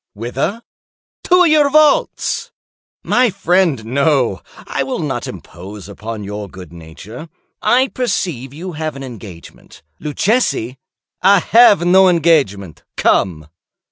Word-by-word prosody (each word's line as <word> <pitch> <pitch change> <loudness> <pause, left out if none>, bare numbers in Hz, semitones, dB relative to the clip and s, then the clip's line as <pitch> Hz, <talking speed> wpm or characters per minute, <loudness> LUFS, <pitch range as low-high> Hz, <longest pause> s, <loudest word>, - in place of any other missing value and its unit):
"Whither?" 135 - -4 0.6
"To 360 0 +4
your 305 -2 +4
vaults." 305 0 +1 0.5
"My 250 -1 +2
friend, 180 - 0
no; 135 -4 0 0.2
I - - -3
will - - -3
not - - -4
impose 95 +2 -10
upon 105 +1 -7
your 105 0 -7
good 90 -1 -12
nature. 85 - -11 0.3
I 255 +2 +2
perceive 175 - -3
you 175 +6 -8
have 155 -1 -5
an 135 - -8
engagement. 105 -9 -12 0.2
Luchesi—" 150 - -1 0.4
"I 195 +2 +5
have 205 -3 +5
no 190 +1 +5
engagement;—come." 100 - 0
145 Hz, 110 wpm, -17 LUFS, -, 0.6 s, I